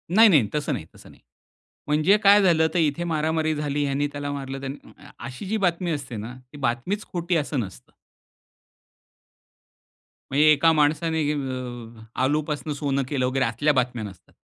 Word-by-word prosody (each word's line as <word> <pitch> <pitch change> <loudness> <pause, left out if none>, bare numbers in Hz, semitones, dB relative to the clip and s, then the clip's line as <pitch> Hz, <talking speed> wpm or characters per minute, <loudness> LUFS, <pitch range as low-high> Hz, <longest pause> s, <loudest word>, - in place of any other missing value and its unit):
नाही, 225 +1 +8
नाही. 145 - +4
तसं 150 - -1
नाही, - - -5
तसं - - -15
नाही. - - -21 0.7
म्हणजे 155 +7 +4
काय 200 +1 +7
झालं, 160 -3 +4
तर 180 - +1
इथे 160 +1 +1
मारामारी 160 -1 0
झाली, 145 -1 -1
ह्यानी 140 +1 0
त्याला 145 0 -4
मारलं 135 -1 -5
त्यानी 135 +1 -6
अ, - - -15 0.2
अ, - - -15 0.2
अशी 125 +9 -8
जी 215 +3 -1
बातमी 180 -3 0
असते 140 -5 -4
ना, 110 +4 -6 0.2
ती - - -10
बातमीच 130 - -2
खोटी 175 0 -1
असं 145 -2 -1
नसतं. 95 - -7 2.4
म्हणजे 145 +3 +4
एका 165 +2 +4
माणसाने, 160 +2 +1
अ, - - -1
अ, 120 -4 -6 0.2
आलूपासून 150 +1 -1
सोनं 140 -1 -1
केलं 135 -2 -1
वगैरे 130 +1 +1
आतल्या 120 +7 +1
बातम्या 125 -3 -1
नसतात. 95 -4 -11
145 Hz, 170 wpm, -24 LUFS, 130-160 Hz, 2.4 s, नाही